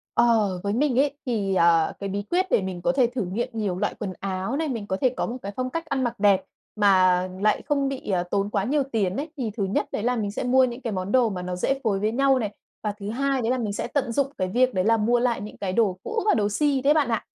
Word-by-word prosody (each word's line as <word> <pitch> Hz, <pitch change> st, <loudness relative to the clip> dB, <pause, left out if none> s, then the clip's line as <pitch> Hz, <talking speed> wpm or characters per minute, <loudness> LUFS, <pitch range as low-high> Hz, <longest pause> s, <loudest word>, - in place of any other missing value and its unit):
Ờ, 215 Hz, -6 st, +3 dB
với 200 Hz, +1 st, -1 dB
mình 260 Hz, 0 st, +2 dB
ấy 285 Hz, 0 st, +2 dB
thì, 205 Hz, -6 st, -1 dB
ờ, 170 Hz, -2 st, +4 dB
cái 200 Hz, -1 st, -4 dB
bí 200 Hz, +1 st, -2 dB
quyết 365 Hz, +2 st, +2 dB
để -, -, +4 dB
mình 185 Hz, -2 st, -5 dB
có 260 Hz, -, +2 dB
thể 260 Hz, -3 st, +3 dB
thử 240 Hz, -5 st, -3 dB
nghiệm 225 Hz, +7 st, -2 dB
nhiều 205 Hz, -5 st, -2 dB
loại 205 Hz, -, -1 dB
quần 200 Hz, -4 st, -4 dB
áo 195 Hz, +5 st, -3 dB
này, 320 Hz, -1 st, -1 dB
mình 225 Hz, -6 st, -4 dB
có 190 Hz, -, -1 dB
thể 255 Hz, -, +4 dB
có -, -, 0 dB
một 240 Hz, -, -4 dB
cái 200 Hz, -, -5 dB
phong 255 Hz, 0 st, -2 dB
cách 330 Hz, +5 st, -4 dB
ăn 275 Hz, -4 st, -1 dB
mặc 240 Hz, -1 st, -3 dB
đẹp 200 Hz, -2 st, +4 dB, 0.3 s
mà 185 Hz, -3 st, +4 dB, 0.2 s
lại 215 Hz, 0 st, +2 dB
không 280 Hz, -2 st, 0 dB
bị, 275 Hz, -5 st, -6 dB
ờ, 180 Hz, -3 st, +1 dB
tốn 200 Hz, 0 st, 0 dB
quá 200 Hz, -2 st, 0 dB
nhiều 280 Hz, +6 st, +1 dB
tiền 195 Hz, -5 st, 0 dB
ấy. 300 Hz, +3 st, -3 dB
Thì 235 Hz, -6 st, -2 dB
thứ 205 Hz, -, 0 dB
nhất 190 Hz, -, 0 dB
đấy 210 Hz, -, -3 dB
là 250 Hz, +1 st, +1 dB
mình 210 Hz, -4 st, -2 dB
sẽ -, -, -4 dB
mua 260 Hz, +1 st, +4 dB
những 245 Hz, 0 st, -2 dB
cái 230 Hz, -4 st, -3 dB
món 185 Hz, +1 st, -3 dB
đồ 250 Hz, -2 st, +4 dB
mà 185 Hz, -3 st, -4 dB
nó 180 Hz, 0 st, -4 dB
dễ 270 Hz, +9 st, 0 dB
phối 205 Hz, -4 st, +1 dB
với 210 Hz, +2 st, 0 dB
nhau 270 Hz, +2 st, +3 dB
này, 210 Hz, -3 st, -3 dB, 0.3 s
và 210 Hz, -, 0 dB
thứ 200 Hz, 0 st, -5 dB
hai 270 Hz, +3 st, 0 dB
đấy 230 Hz, +1 st, 0 dB
là 255 Hz, -, +1 dB
mình 215 Hz, -5 st, -2 dB
sẽ -, -, -3 dB
tận 275 Hz, -5 st, -1 dB
dụng 275 Hz, +3 st, +1 dB
cái 185 Hz, -, 0 dB
việc 250 Hz, +6 st, +2 dB
đấy 185 Hz, -, +1 dB
là 225 Hz, +1 st, +4 dB
mua 235 Hz, +3 st, +2 dB
lại 240 Hz, -4 st, 0 dB
những 210 Hz, -, -8 dB
cái 190 Hz, -2 st, -3 dB
đồ 200 Hz, -4 st, +2 dB
cũ 450 Hz, 0 st, -2 dB
và 425 Hz, -, +4 dB
đồ 205 Hz, -1 st, +1 dB
si 280 Hz, +4 st, +1 dB
đấy 280 Hz, +3 st, +4 dB
bạn 300 Hz, -4 st, +2 dB
ạ. 225 Hz, -2 st, -1 dB
225 Hz, 295 wpm, -24 LUFS, 195-260 Hz, 0.3 s, ờ